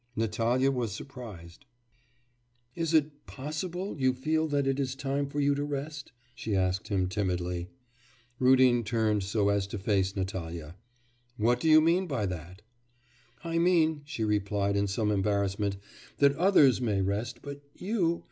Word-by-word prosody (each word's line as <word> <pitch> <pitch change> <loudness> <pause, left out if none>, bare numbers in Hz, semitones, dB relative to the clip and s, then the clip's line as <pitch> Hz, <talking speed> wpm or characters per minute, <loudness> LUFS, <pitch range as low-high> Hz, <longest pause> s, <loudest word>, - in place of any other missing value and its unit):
Natalya 115 +4 +1
was 120 -4 -2
surprised. 115 -6 -10 1.1
'Is 165 0 -2
it 150 -2 +1
possible 170 +7 -5
you 130 -1 +2
feel 155 +4 0
that 145 -2 0
it 135 0 0
is 135 -1 -1
time 140 +1 -2
for 145 +1 -4
you 145 0 +3
to 145 +1 -2
rest?' 145 0 -5 0.2
she 110 -5 -3
asked 95 0 0
him 95 -3 0
timidly. 90 -2 -2 0.7
Rudin 130 -2 +5
turned 110 -2 +1
so 100 +1 +1
as 100 -1 +1
to 100 - -5
face 95 -1 0
Natalya. 85 -4 -5 0.6
'What 120 +3 +2
do 160 - +1
you 155 0 +8
mean 175 +4 +2
by 115 -9 -1
that?' 90 +1 -7 0.8
'I 165 0 -1
mean,' 165 -3 +3
she 145 -7 -4
replied 100 -1 0
in 100 0 +1
some 105 +2 0
embarrassment, 100 0 0 0.4
'that 140 -1 +4
others 150 - +5
may 105 -5 0
rest; 110 +5 -3
but 145 0 -7
you... 180 -4 0
120 Hz, 150 wpm, -29 LUFS, 100-145 Hz, 1.1 s, you